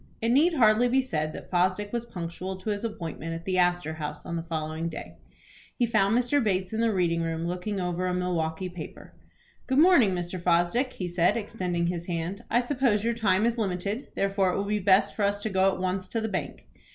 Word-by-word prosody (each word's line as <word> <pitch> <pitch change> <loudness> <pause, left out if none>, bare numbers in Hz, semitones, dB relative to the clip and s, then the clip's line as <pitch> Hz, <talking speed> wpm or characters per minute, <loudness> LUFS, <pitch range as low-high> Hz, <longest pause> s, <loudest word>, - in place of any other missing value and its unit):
It 230 - 0
need 310 +8 +4
hardly 230 -2 +5
be 260 +2 +2
said 155 -11 -2
that - - -10
Fosdick 185 +4 +1
was 235 -1 -2
punctual 180 0 -5
to 185 +3 -4
his 205 +1 -3
appointment 165 -6 -4
at 165 0 -8
the 185 -1 +1
Astor 175 -2 +1
House 150 -1 -6
on 170 - -4
the 165 - -2
following 160 0 -3
day. 160 - -8 0.6
He 245 - +2
found 215 -1 +2
Mr. 250 +3 +2
Bates 185 -2 0
in 220 - -1
the 230 -1 +3
reading 170 -4 +1
room, 165 0 -2
looking 180 +3 -3
over 180 0 -1
a - - 0
Milwaukie 180 -1 -1
paper. 165 -3 -9 0.5
"Good 265 - +1
morning, 285 - +6
Mr. 175 0 -4
Fosdick," 175 +9 +2
he 180 - -4
said, 175 +4 +2
extending 185 -6 -2
his 170 -1 -3
hand. 175 +5 -3
"I 240 - +3
suppose 245 -5 +1
your 235 +1 +1
time 210 -3 +2
is 235 0 0
limited, 200 +4 -2
therefore 195 -1 +1
it - - -1
will 200 - 0
be 210 +1 0
best 190 0 +4
for - - -5
us 205 0 +1
to 220 - -3
go 190 0 +3
at 190 - -5
once 185 0 -2
to 225 - -2
the 220 - -2
bank." 190 -4 -4
190 Hz, 220 wpm, -27 LUFS, 175-220 Hz, 0.6 s, morning